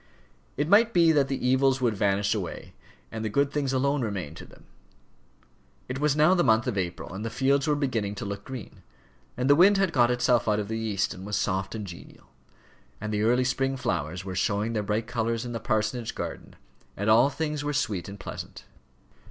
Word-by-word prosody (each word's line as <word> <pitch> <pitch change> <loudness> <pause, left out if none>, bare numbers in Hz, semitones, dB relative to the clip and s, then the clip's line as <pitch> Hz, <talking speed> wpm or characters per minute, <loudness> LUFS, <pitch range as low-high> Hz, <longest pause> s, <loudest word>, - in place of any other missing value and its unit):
It 145 +2 0
might 220 +5 +5
be 170 -2 +5
that 145 -3 +3
the 135 -2 -2
evils 130 +1 +3
would 120 -4 +1
vanish 100 0 +1
away, 100 -6 -5 0.4
and 110 -1 -5
the 110 - -1
good 140 +6 +1
things 145 -3 -1
alone 140 +2 +1
remain 100 -10 -3
to - - -11
them. - - -18 1.2
It 125 +1 -4
was 150 -1 +2
now 155 +4 +5
the 175 -2 +3
month 110 +1 +3
of 125 -5 -2
April, 90 -2 -4
and 100 +3 -5
the 115 - -2
fields 135 +4 +1
were 150 - +3
beginning 115 -8 -1
to 100 - -5
look 100 0 -5
green, 130 -6 -9 0.6
and 125 +1 0
the 140 - +7
wind 195 +5 +6
had 195 -3 +1
got 120 -3 +4
itself 125 -1 +2
out 105 -1 +2
of 105 0 -4
the 110 0 -2
east 105 -4 -1
and 95 - -10
was 105 +1 -3
soft 95 +1 -1
and 105 -2 -5
genial, 90 -3 -12 0.7
and 110 0 -4
the 105 - 0
early 120 +3 +3
spring 135 +1 0
flowers 90 - -3
were 95 - -5
showing 105 +4 0
their 110 - 0
bright 105 +2 -1
colours 115 0 -2
in 120 - -5
the 115 - -3
parsonage 110 +1 -1
garden, - - -6 0.4
and 100 - -2
all 115 +5 +6
things 150 0 -3
were 145 - -1
sweet 100 - -2
and 100 0 -9
pleasant. - - -8
115 Hz, 210 wpm, -27 LUFS, 105-140 Hz, 1.2 s, the